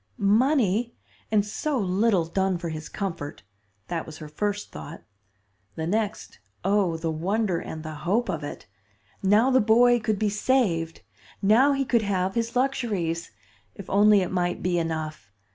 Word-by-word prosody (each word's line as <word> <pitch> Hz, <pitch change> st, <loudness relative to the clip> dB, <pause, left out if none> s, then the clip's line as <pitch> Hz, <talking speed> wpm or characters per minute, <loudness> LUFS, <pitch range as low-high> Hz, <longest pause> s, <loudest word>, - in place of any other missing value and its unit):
Money! 230 Hz, +1 st, +2 dB, 0.4 s
and 210 Hz, -2 st, +3 dB
so 285 Hz, +7 st, -2 dB
little 195 Hz, -2 st, +2 dB
done 190 Hz, +2 st, 0 dB
for 170 Hz, 0 st, -5 dB
his 155 Hz, 0 st, -6 dB
comfort! 165 Hz, -, -5 dB, 0.4 s
That 170 Hz, -2 st, -3 dB
was 155 Hz, -1 st, -9 dB
her 155 Hz, -, -8 dB
first 205 Hz, +7 st, -3 dB
thought. -, -, -9 dB, 0.7 s
The 160 Hz, -, -3 dB
next, 210 Hz, -, -2 dB, 0.3 s
oh, 195 Hz, -4 st, +2 dB
the 160 Hz, 0 st, -2 dB
wonder 185 Hz, +3 st, 0 dB
and 160 Hz, 0 st, -7 dB
the 155 Hz, -1 st, -6 dB
hope 215 Hz, +7 st, +1 dB
of 160 Hz, -2 st, -3 dB
it! 145 Hz, -, -7 dB, 0.6 s
Now 210 Hz, +7 st, +4 dB
the 260 Hz, -, +5 dB
boy 240 Hz, +3 st, +5 dB
could 215 Hz, -1 st, -1 dB
be 215 Hz, -, +1 dB
saved; 200 Hz, -8 st, 0 dB, 0.4 s
now 240 Hz, +8 st, +5 dB
he 275 Hz, 0 st, 0 dB
could 235 Hz, -2 st, +2 dB
have 190 Hz, -2 st, -1 dB
his 230 Hz, +1 st, -2 dB
luxuries. 210 Hz, -11 st, -1 dB, 0.5 s
If 200 Hz, -, -10 dB
only 205 Hz, 0 st, +5 dB
it 180 Hz, -, -2 dB
might 175 Hz, -1 st, -1 dB
be 175 Hz, -1 st, +1 dB
enough! 155 Hz, -9 st, -4 dB
200 Hz, 160 wpm, -25 LUFS, 165-225 Hz, 0.7 s, the